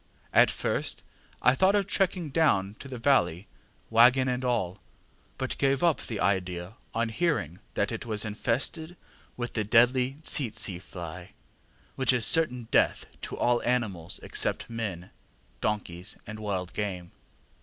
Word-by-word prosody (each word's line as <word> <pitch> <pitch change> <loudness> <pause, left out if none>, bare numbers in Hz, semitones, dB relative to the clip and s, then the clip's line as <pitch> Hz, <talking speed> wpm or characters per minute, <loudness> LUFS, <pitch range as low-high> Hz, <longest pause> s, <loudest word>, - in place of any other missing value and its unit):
At - - +7
first - - -2 0.4
I 125 - +6
thought 190 +8 +3
of 200 -1 +2
trekking 180 -5 0
down 105 -12 +2
to - - -9
the 130 -2 -6
valley, 105 - +2 0.5
waggon 125 +3 +6
and 125 0 -1
all, 100 -7 -1 0.6
but 130 - -4
gave 135 +1 +2
up 170 -3 +3
the 110 -4 -5
idea 90 -1 -1 0.2
on 115 0 +1
hearing 115 - -1 0.2
that - - 0
it - - -4
was 110 -2 -2
infested 130 - -2 0.4
with 120 -1 -4
the 110 - 0
deadly 125 +4 +4
ŌĆśtsetseŌĆÖ 105 -11 -1
fly, 85 -4 -9 0.6
which 130 -1 +3
is 120 -3 +2
certain 125 -8 +3
death - - +3 0.2
to - - -6
all 120 -1 +2
animals, 110 -9 -1
except - - -2
men, 100 -6 -4 0.5
donkeys, 95 -4 -2
and 110 0 -7
wild 95 -4 -3
game. 90 -4 -4
115 Hz, 145 wpm, -28 LUFS, 95-130 Hz, 0.6 s, At